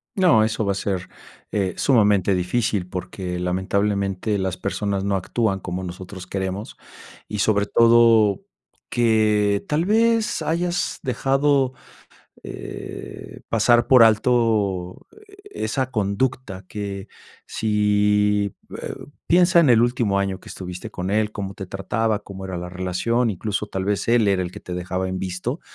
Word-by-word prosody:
No, 175 Hz, -, +5 dB
eso 110 Hz, 0 st, -1 dB
va 100 Hz, -, +1 dB
a -, -, -6 dB
ser, 95 Hz, -2 st, -3 dB, 0.5 s
eh, 95 Hz, -4 st, 0 dB
sumamente 105 Hz, -7 st, +3 dB
difícil 95 Hz, +1 st, 0 dB
porque, 90 Hz, -1 st, -5 dB
lamentablemente, 100 Hz, +2 st, -1 dB
las 95 Hz, -1 st, -2 dB
personas 100 Hz, -2 st, -2 dB
no 100 Hz, -, +1 dB
actúan 95 Hz, +1 st, -1 dB
como 90 Hz, +1 st, -4 dB
nosotros 90 Hz, +1 st, -8 dB
queremos 95 Hz, +2 st, -4 dB, 0.5 s
y, 105 Hz, -, -4 dB
sobre 100 Hz, +1 st, +2 dB
todo, 115 Hz, -, +5 dB, 0.5 s
que 105 Hz, -3 st, +2 dB
tal 155 Hz, +3 st, +1 dB
vez 225 Hz, +1 st, +2 dB
hayas 175 Hz, +2 st, -1 dB
dejado, 135 Hz, +1 st, +1 dB, 0.7 s
eh, -, -, -8 dB
pasar 120 Hz, 0 st, +3 dB
por 125 Hz, -3 st, +7 dB
alto 110 Hz, -5 st, +1 dB, 0.4 s
esa 135 Hz, -, -2 dB
conducta 105 Hz, -2 st, -2 dB
que, 100 Hz, -1 st, -6 dB, 0.4 s
sí, 105 Hz, -1 st, +1 dB, 0.3 s
eh, -, -, -5 dB, 0.3 s
piensa 175 Hz, 0 st, +4 dB
en 150 Hz, -6 st, +5 dB
el 115 Hz, -1 st, +6 dB
último 120 Hz, -5 st, +1 dB
año 95 Hz, -1 st, -1 dB
que -, -, -14 dB
estuviste 90 Hz, +4 st, -7 dB
con 95 Hz, -2 st, -4 dB
él, 105 Hz, 0 st, +1 dB
¿cómo 100 Hz, -1 st, -5 dB
te 95 Hz, -, -7 dB
trataba, 105 Hz, +3 st, -1 dB
cómo 95 Hz, -2 st, -10 dB
era 95 Hz, -2 st, -4 dB
la 90 Hz, 0 st, -6 dB
relación? 95 Hz, +6 st, 0 dB
Incluso 105 Hz, +2 st, -3 dB
tal 95 Hz, -1 st, -3 dB
vez 100 Hz, -1 st, -1 dB
él 115 Hz, -3 st, +3 dB
era 95 Hz, -2 st, +2 dB
el 90 Hz, -, -4 dB
que -, -, -9 dB
te 90 Hz, -, -7 dB
dejaba 90 Hz, +1 st, -3 dB
en 95 Hz, 0 st, -3 dB
visto 95 Hz, -, -4 dB
105 Hz, 140 wpm, -22 LUFS, 95-115 Hz, 0.7 s, por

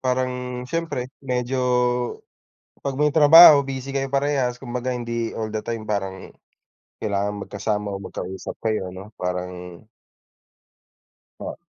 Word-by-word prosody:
parang 125 Hz, -1 st, -2 dB
siyempre 165 Hz, -4 st, -3 dB, 0.2 s
medyo 125 Hz, -1 st, -2 dB, 1.3 s
'pag 140 Hz, -, -1 dB
may 150 Hz, -, +4 dB
trabaho 150 Hz, -1 st, +9 dB
busy 135 Hz, 0 st, -5 dB
kayo 135 Hz, 0 st, -2 dB
parehas, 135 Hz, -3 st, 0 dB
kumbaga 125 Hz, 0 st, -3 dB
hindi 115 Hz, -1 st, -3 dB
all 110 Hz, -1 st, -3 dB
the 110 Hz, 0 st, -4 dB
time 115 Hz, -2 st, -4 dB
parang 95 Hz, -2 st, -3 dB, 0.7 s
kailangan 100 Hz, -1 st, -2 dB
magkasama 105 Hz, 0 st, -3 dB
o 95 Hz, -, -5 dB
magkausap 95 Hz, 0 st, -6 dB
kayo 110 Hz, -4 st, 0 dB
'no, 95 Hz, +4 st, -10 dB
parang 90 Hz, 0 st, -5 dB, 1.6 s
Po. -, -, -6 dB
120 Hz, 120 wpm, -23 LUFS, 100-135 Hz, 1.6 s, trabaho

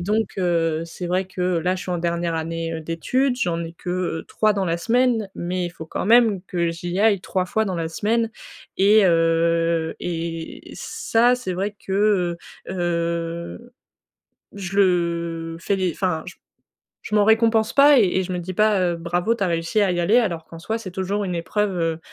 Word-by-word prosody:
donc, 210 Hz, +4 st, +1 dB
heu 165 Hz, -3 st, +1 dB
c'est 170 Hz, +1 st, -7 dB
vrai 185 Hz, +2 st, 0 dB
que, 185 Hz, -, -8 dB, 0.2 s
là, 180 Hz, +3 st, 0 dB
je 180 Hz, -, -6 dB
suis -, -, -6 dB
en 175 Hz, -, -1 dB
dernière 170 Hz, 0 st, -1 dB
année, 165 Hz, +1 st, -3 dB
heu, 160 Hz, -, -4 dB
d'études, 245 Hz, -, 0 dB
j'en 170 Hz, -5 st, 0 dB
ai 165 Hz, -, -7 dB
que, 175 Hz, -, -6 dB
heu, 180 Hz, -3 st, -2 dB
3 215 Hz, -1 st, +2 dB
dans 195 Hz, -, 0 dB
la 170 Hz, -2 st, 0 dB
semaine, 230 Hz, +2 st, +1 dB
mais 180 Hz, +1 st, -2 dB
il -, -, -6 dB
faut 160 Hz, -2 st, -10 dB
quand -, -, -4 dB
même 225 Hz, -5 st, +5 dB
que 170 Hz, -3 st, -1 dB
j'y 175 Hz, +2 st, -4 dB
aille 210 Hz, -2 st, +4 dB
3 185 Hz, 0 st, -2 dB
fois 220 Hz, +4 st, 0 dB
dans 190 Hz, -4 st, -3 dB
la 165 Hz, -1 st, -2 dB
semaine. 225 Hz, +6 st, 0 dB, 0.5 s
Et, 210 Hz, +3 st, +5 dB
he, 165 Hz, -1 st, +2 dB
et 165 Hz, -1 st, -5 dB
ça, 240 Hz, +2 st, +1 dB
c'est 245 Hz, -7 st, -4 dB
vrai 200 Hz, +3 st, -3 dB
que, 190 Hz, -3 st, +1 dB, 0.3 s
heu 190 Hz, -, -4 dB
heu, 170 Hz, +5 st, -3 dB, 0.8 s
je 195 Hz, -1 st, -5 dB
le 170 Hz, -3 st, 0 dB
fais 185 Hz, 0 st, 0 dB
enfin, 180 Hz, -5 st, -1 dB
j 185 Hz, -, -8 dB, 0.7 s
je 210 Hz, -, -2 dB
m'en 205 Hz, -1 st, +4 dB
récompense 220 Hz, 0 st, +3 dB
pas 285 Hz, -1 st, +7 dB
et -, -, +5 dB
et 190 Hz, -, +1 dB
je 185 Hz, -, -6 dB
me 180 Hz, -, -2 dB
dis 180 Hz, +2 st, -5 dB
pas, 210 Hz, 0 st, +3 dB
heu: 175 Hz, -2 st, +1 dB
«Bravo, 175 Hz, +7 st, 0 dB
tu 200 Hz, -, -2 dB
as -, -, +1 dB
réussi 170 Hz, +5 st, 0 dB
à 195 Hz, -, +3 dB
y 175 Hz, -, -1 dB
aller» 200 Hz, +8 st, +3 dB
alors 170 Hz, -8 st, -2 dB
qu'en 165 Hz, -, -11 dB
soi, 220 Hz, +7 st, -3 dB
c'est 225 Hz, -4 st, -7 dB
toujours 195 Hz, +3 st, -2 dB
une 180 Hz, -2 st, -3 dB
épreuve, 190 Hz, +3 st, -1 dB
heu, 165 Hz, -1 st, -1 dB
180 Hz, 200 wpm, -22 LUFS, 170-210 Hz, 0.8 s, pas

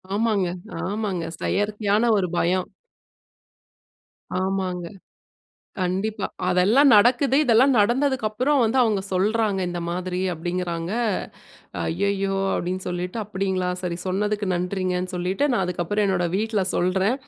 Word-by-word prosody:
ஆமாங்க, 215 Hz, -3 st, +1 dB, 0.4 s
ஆமாங்க. 200 Hz, -4 st, -2 dB, 0.2 s
செயற்கையான 205 Hz, +1 st, 0 dB
ஒரு 190 Hz, -2 st, +1 dB
பயம். 180 Hz, +2 st, +1 dB, 1.7 s
ஆமாங்க. 185 Hz, -2 st, -2 dB, 0.9 s
கண்டிப்பா. 195 Hz, +4 st, -1 dB, 0.2 s
அதெல்லாம் 195 Hz, +11 st, +4 dB
நடக்குது. 245 Hz, +5 st, +4 dB
இதெல்லாம் 255 Hz, +2 st, +5 dB
நடந்ததுக்கப்புறம் 255 Hz, +3 st, +1 dB
வந்து, 225 Hz, +3 st, +1 dB
அவங்க 215 Hz, -4 st, +1 dB
சொல்றாங்க 205 Hz, +1 st, +1 dB
இந்த 175 Hz, 0 st, -4 dB
மாதிரி 180 Hz, +1 st, -3 dB, 0.2 s
அப்டிங்கிறாங்க. 175 Hz, +1 st, -3 dB, 0.9 s
ஐயயோ! 195 Hz, -, -1 dB, 0.2 s
அப்டீன்னு 185 Hz, +2 st, -2 dB
சொல்லிட்டு. 180 Hz, +2 st, -3 dB
"அப்டிங்களா? 190 Hz, -2 st, -2 dB, 0.2 s
சரி 175 Hz, -2 st, -2 dB
சொன்னதுக்கு 205 Hz, +2 st, -1 dB
நன்றிங்கன்னு", 180 Hz, 0 st, -1 dB
சொல்லிட்டு, 180 Hz, +8 st, -1 dB
நான் 230 Hz, -, +1 dB
அதுக்கப்புறம் 180 Hz, +3 st, -1 dB
என்னோட 190 Hz, -2 st, +1 dB
வீட்ல 215 Hz, 0 st, 0 dB
சொல்றேன். 190 Hz, +5 st, +1 dB
195 Hz, 105 wpm, -23 LUFS, 180-215 Hz, 1.7 s, இதெல்லாம்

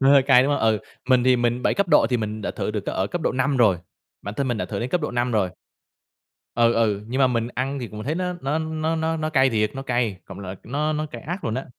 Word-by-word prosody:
Nó 135 Hz, 0 st, +5 dB
hơi 140 Hz, -1 st, +7 dB
cay, 130 Hz, -1 st, +6 dB
đúng 140 Hz, -, +1 dB
hông? -, -, 0 dB
Ừ, 110 Hz, -1 st, +3 dB, 0.3 s
mình 125 Hz, -2 st, +4 dB
thì 130 Hz, 0 st, +5 dB
mình 120 Hz, 0 st, 0 dB
7 -, -, +2 dB
cấp 200 Hz, -2 st, 0 dB
độ 150 Hz, -7 st, +5 dB
thì 125 Hz, -, +3 dB
mình 110 Hz, -1 st, -4 dB
đã -, -, -2 dB
thử -, -, -3 dB
được 105 Hz, -1 st, -2 dB
cấp -, -, -3 dB
ở 95 Hz, -, 0 dB
cấp 175 Hz, -, -4 dB
độ -, -, +1 dB
5 135 Hz, +2 st, +1 dB
rồi, 110 Hz, -7 st, +4 dB, 0.5 s
bản 100 Hz, -, -6 dB
thân 135 Hz, +3 st, -1 dB
mình 120 Hz, -3 st, -1 dB
đã -, -, -1 dB
thử 100 Hz, -, -4 dB
đến 120 Hz, -, -2 dB
cấp 180 Hz, -, +1 dB
độ 150 Hz, -, -2 dB
5 120 Hz, 0 st, -1 dB
rồi. 100 Hz, -5 st, +1 dB, 1.1 s
Ừ, 115 Hz, 0 st, +4 dB
ừ, 105 Hz, -3 st, +1 dB
nhưng 125 Hz, +4 st, -3 dB
mà 135 Hz, -, +5 dB
mình 120 Hz, -2 st, 0 dB
ăn 135 Hz, +2 st, -2 dB
thì 120 Hz, -3 st, -5 dB
cũng 105 Hz, +1 st, -7 dB
thấy 150 Hz, -, -1 dB
nó 180 Hz, +1 st, -1 dB
nó 140 Hz, +3 st, -1 dB
nó 160 Hz, 0 st, -2 dB
nó 160 Hz, 0 st, 0 dB
nó 155 Hz, 0 st, -2 dB
cay 135 Hz, -3 st, +4 dB
thiệt, 105 Hz, -2 st, +1 dB
nó 135 Hz, -, -5 dB
cay, 120 Hz, -6 st, 0 dB
cộng 95 Hz, 0 st, -10 dB
lại 95 Hz, 0 st, -6 dB
nó 150 Hz, +6 st, -1 dB
nó 155 Hz, 0 st, -2 dB
cay 150 Hz, -, -9 dB
ác 175 Hz, +4 st, -5 dB
luôn 110 Hz, -, -1 dB
á. 130 Hz, -, -3 dB
125 Hz, 300 wpm, -23 LUFS, 110-145 Hz, 1.1 s, hơi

